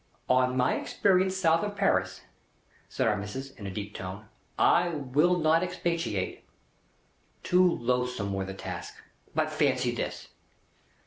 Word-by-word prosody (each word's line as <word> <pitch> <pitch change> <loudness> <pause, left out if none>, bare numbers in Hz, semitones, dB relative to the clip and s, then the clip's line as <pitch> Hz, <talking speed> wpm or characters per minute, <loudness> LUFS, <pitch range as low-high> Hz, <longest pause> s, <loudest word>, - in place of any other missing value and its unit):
"On 130 0 +3
my 125 0 +3
experience 190 -1 +1
south 165 -2 +3
of 205 -1 -3
Paris," 95 - +1 0.7
said - - 0
Our 105 - +3
Missis, 115 +7 -6
in 105 -7 -9
a - - -4
deep 105 +1 -6
tone, 95 +3 -7 0.3
"I 175 +1 +4
will 150 +3 +2
not 160 0 +3
expatiate. 170 - -2 1.0
Too 180 +1 +4
loathsome 125 -5 -1
were 95 0 -2
the 95 0 -7
task! - - -7 0.4
But - - +1
fancy - - +1
this. - - -5
125 Hz, 135 wpm, -28 LUFS, 100-170 Hz, 1.0 s, I